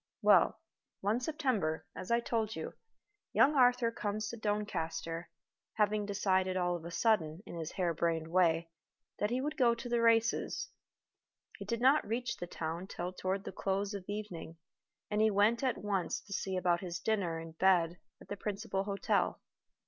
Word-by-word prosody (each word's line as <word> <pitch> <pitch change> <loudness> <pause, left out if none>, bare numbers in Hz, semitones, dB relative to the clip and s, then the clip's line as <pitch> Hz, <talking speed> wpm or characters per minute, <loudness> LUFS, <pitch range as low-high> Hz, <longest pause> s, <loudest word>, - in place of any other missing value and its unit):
Well, - - +5 0.4
one 210 +4 +1
September, 250 - -1
as 185 - -7
I 235 0 +3
told 220 -2 -1
you, - - -5 0.6
young 295 - +5
Arthur 250 -3 +4
comes 210 -2 -3
to - - -5
Doncaster, 170 -6 -2 0.4
having 210 -1 +1
decided 190 -2 +1
all 175 -1 +1
of 170 - -7
a - - -5
sudden, 175 -2 +1
in - - -8
his 165 -2 -5
hare 175 -3 0
brained 165 0 0
way, 165 -2 +2 0.5
that 210 - +1
he 250 +2 0
would 300 +3 -2
go 240 -4 +4
to 235 +1 -7
the 240 -1 +1
races. 230 0 +2 0.9
He - - -6
did 235 -1 -2
not 270 +4 +5
reach 235 +2 -2
the 175 - -5
town 170 +2 -4
till 180 -1 -4
toward 190 +1 -2
the - - -6
close 195 +2 -1
of 200 -2 -6
evening, 195 -6 -5 0.5
and 210 +1 +2
he 220 - +5
went 210 +3 +3
at 260 -2 +1
once 195 -4 -1
to 200 - -9
see 190 -1 -2
about 175 -1 +2
his 175 -2 -4
dinner 185 -5 0
and 165 0 -8
bed 180 -2 +3 0.2
at - - -15
the 205 - -5
principal 200 -1 -2
hotel. 200 -1 0
200 Hz, 175 wpm, -33 LUFS, 175-225 Hz, 0.9 s, Well